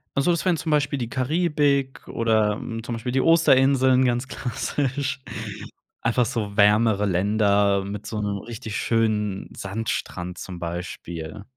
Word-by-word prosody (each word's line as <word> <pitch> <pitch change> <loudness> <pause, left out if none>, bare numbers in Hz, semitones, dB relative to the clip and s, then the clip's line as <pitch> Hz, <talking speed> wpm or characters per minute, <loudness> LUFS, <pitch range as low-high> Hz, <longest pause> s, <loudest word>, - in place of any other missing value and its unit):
Also, 140 +5 +3
das 170 - -1
wären 180 -3 +3
zum 160 - -3
Beispiel 145 -2 +1
die 120 -3 -3
Karibik 140 -1 0
oder, 110 -2 +1
hm, 115 +1 -6
zum 120 0 -4
Beispiel 115 +2 -4
die 130 +1 +2
Osterinseln 135 -5 +4
ganz 120 +1 0
klassisch. 135 +2 -2 0.8
Einfach 120 +1 +2
so 110 -4 -3
wärmere 105 0 +4
Länder 100 +1 +2
mit 100 +1 -6
so 105 -1 -3
'nem 100 -1 -2
richtig 110 0 -6
schönen 105 -4 0
Sandstrand 95 -4 -4
zum 90 +1 -7
Beispiel. 85 0 -6
115 Hz, 140 wpm, -24 LUFS, 100-135 Hz, 0.8 s, Osterinseln